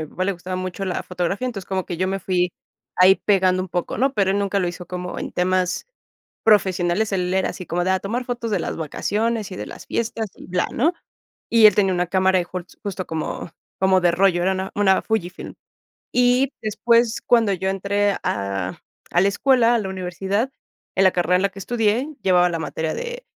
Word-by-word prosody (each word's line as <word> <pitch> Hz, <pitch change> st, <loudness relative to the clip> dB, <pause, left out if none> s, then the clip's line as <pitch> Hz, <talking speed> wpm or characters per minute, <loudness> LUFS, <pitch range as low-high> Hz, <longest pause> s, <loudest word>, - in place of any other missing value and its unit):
mi 155 Hz, -, -7 dB
papá 185 Hz, -, -3 dB
le 200 Hz, -, +1 dB
gustaba 185 Hz, 0 st, -6 dB
mucho 185 Hz, +1 st, -4 dB
la 185 Hz, -2 st, -2 dB
fotografía, 180 Hz, +6 st, -2 dB
entonces 200 Hz, -7 st, -5 dB
como 190 Hz, -1 st, -2 dB
que 175 Hz, -, -4 dB
yo 185 Hz, +2 st, 0 dB
me 195 Hz, +1 st, -1 dB
fui 180 Hz, -1 st, 0 dB, 0.4 s
ahí 185 Hz, +1 st, +7 dB
pegando 185 Hz, -2 st, +2 dB
un 185 Hz, -, -7 dB
poco, 175 Hz, 0 st, -3 dB
¿no? 270 Hz, +3 st, +2 dB
Pero 195 Hz, -4 st, +2 dB
él 200 Hz, -, +1 dB
nunca 200 Hz, 0 st, 0 dB
lo 180 Hz, -2 st, 0 dB
hizo 175 Hz, 0 st, -7 dB
como 180 Hz, 0 st, -5 dB
en -, -, -5 dB
temas 185 Hz, -, 0 dB, 0.6 s
profesionales. 190 Hz, -1 st, +3 dB
Él 180 Hz, -1 st, 0 dB
era 190 Hz, 0 st, +1 dB
así 185 Hz, -, -7 dB
como 175 Hz, +1 st, -1 dB
de 185 Hz, -, 0 dB
a 190 Hz, -, +2 dB
tomar 230 Hz, +7 st, -3 dB
fotos 240 Hz, -2 st, -3 dB
de 200 Hz, -, +1 dB
las -, -, -3 dB
vacaciones 210 Hz, +7 st, -2 dB
y 185 Hz, -, -5 dB
de -, -, -5 dB
las -, -, -10 dB
fiestas 225 Hz, -1 st, -2 dB
y -, -, -12 dB
bla, 180 Hz, 0 st, 0 dB
¿no? 320 Hz, +9 st, +2 dB, 0.6 s
Y 225 Hz, -2 st, +7 dB
él 210 Hz, -, +6 dB
tenía 195 Hz, -2 st, +3 dB
una 180 Hz, 0 st, 0 dB
cámara, 190 Hz, +1 st, +2 dB
e -, -, -2 dB
jol 180 Hz, 0 st, -6 dB, 0.2 s
justo 190 Hz, -3 st, -4 dB
como 160 Hz, +1 st, -4 dB, 0.3 s
como 190 Hz, 0 st, +4 dB
de 175 Hz, -1 st, +4 dB
rollo, 175 Hz, 0 st, +3 dB
era 190 Hz, +2 st, +2 dB
una 190 Hz, 0 st, -3 dB
una 195 Hz, -2 st, +3 dB
Fujifilm. 190 Hz, -5 st, -3 dB, 0.6 s
Y 250 Hz, +2 st, +3 dB
después, 230 Hz, +2 st, +2 dB
cuando 230 Hz, -4 st, +4 dB
yo 190 Hz, 0 st, -2 dB
entré 200 Hz, +1 st, 0 dB
a 100 Hz, -2 st, -2 dB, 0.3 s
a 175 Hz, -, +3 dB
la 195 Hz, -, +4 dB
escuela, 240 Hz, +2 st, +3 dB
a -, -, +3 dB
la 200 Hz, -3 st, -3 dB
universidad, 190 Hz, +6 st, -2 dB, 0.5 s
en 195 Hz, -, +4 dB
la 190 Hz, -, +7 dB
carrera 175 Hz, 0 st, +2 dB
en 180 Hz, -, +1 dB
la 200 Hz, -, +2 dB
que 195 Hz, -, -12 dB
estudié 225 Hz, +5 st, 0 dB
llevaba 180 Hz, -1 st, +4 dB
la 170 Hz, -1 st, -2 dB
materia 160 Hz, 0 st, -3 dB
de 485 Hz, +1 st, -6 dB
190 Hz, 215 wpm, -22 LUFS, 180-210 Hz, 0.6 s, ahí